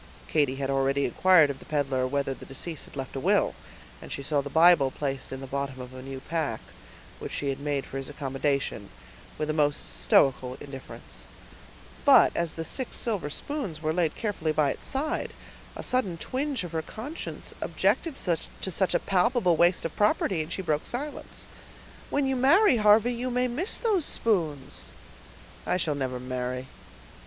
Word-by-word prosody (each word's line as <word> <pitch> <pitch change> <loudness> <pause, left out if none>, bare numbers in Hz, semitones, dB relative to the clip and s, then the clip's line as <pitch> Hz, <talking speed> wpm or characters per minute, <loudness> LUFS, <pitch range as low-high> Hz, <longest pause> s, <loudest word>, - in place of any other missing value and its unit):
Katy 145 -4 +2
had 135 0 -2
already 135 +1 +2
inquired 160 +2 +5
of 135 - -9
the - - -14
peddler 135 -4 0
whether 140 0 -1
the - - -12
deceased 155 +4 -5
had - - -15
left 135 -1 -5
a - - -2
will; - - +2 0.5
and - - -10
she 140 - -4
saw 145 0 +1
the 145 - -6
Bible 160 -2 +6
placed 135 0 -4
in 130 0 -5
the - - -5
bottom 135 0 -3
of 125 0 -8
a 130 - -8
new 135 0 -7
pack, 155 -7 -2 0.6
which - - -6
she 140 - -2
had 135 0 -2
made 140 -1 -1
for 135 - -6
his 135 +1 -5
accommodation, 140 -6 -2 0.5
with 155 - -2
a 155 - 0
most 145 - 0
stoical 125 - +3
indifference; 135 - -9 0.8
but - - +7
as 170 -2 -1
the 165 - -3
six 260 +6 -2
silver 210 -10 -1
spoons 190 - -4
were 155 0 +1
laid 170 -2 +1
carefully 195 -8 -1
by 150 -2 +2
its - - -7
side, 290 +3 -2 0.4
a - - -6
sudden 205 -10 0
twinge 270 - -2
of 175 - -6
her 160 -1 -1
conscience 250 - -7
objected 330 -5 +1 0.5
to 190 - -2
such 190 +1 +1
a - - +4
palpable 190 -1 +2
waste 175 +2 +3
of 165 - -4
property, 200 -4 +2
and 155 +2 -6
she 190 - -3
broke 155 -3 -1
silence. 290 +5 -5 0.6
"When 285 -1 +1
you 265 0 +1
marry, 275 - +5
Harvey, 215 +3 +5
you 245 +2 -3
may 250 0 +1
miss 300 - +1
those 410 -9 +1
spoons." 160 -11 -1 0.8
"I - - +2
never 140 -7 -1
shall - - -8
marry." 125 0 -3
155 Hz, 180 wpm, -27 LUFS, 135-210 Hz, 0.8 s, but